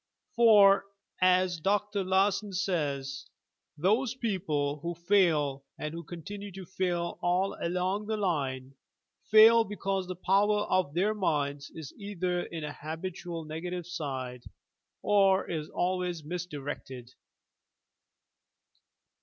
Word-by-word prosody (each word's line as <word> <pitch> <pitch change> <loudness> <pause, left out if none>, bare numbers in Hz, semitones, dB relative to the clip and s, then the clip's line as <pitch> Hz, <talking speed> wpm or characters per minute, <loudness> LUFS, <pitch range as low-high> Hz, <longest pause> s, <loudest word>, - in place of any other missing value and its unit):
For, 205 -5 +6 0.4
as 185 -1 +3
Dr. 205 +3 0
Larson 195 +2 +1
says 145 -8 -2 0.5
"those 220 - +1
people 160 - -1
who 170 +3 -4
fail 165 -7 +2
and 150 0 -5
who 170 0 -6
continue 200 +5 -8
to 190 0 -8
fail 175 -1 -2
all 180 +2 +1
along 185 +4 -1
the 220 0 -1
line, 135 -9 -2 0.6
fail 225 +2 +8
because 195 -3 -3
the 185 - -5
power 205 +3 +2
of 185 -7 0
their 200 +5 +2
minds 145 -8 -1
is 160 -4 -8
either 185 -3 -2
in 165 -2 -6
a 150 -1 -4
habitual 165 +1 -6
negative 175 +3 -5
state, 130 -8 -5 0.6
or 195 -2 +4
is 155 -3 -4
al 185 +1 0
wa3^ 175 -4 -4
misdirected. 145 -7 -6
180 Hz, 115 wpm, -29 LUFS, 155-195 Hz, 0.6 s, fail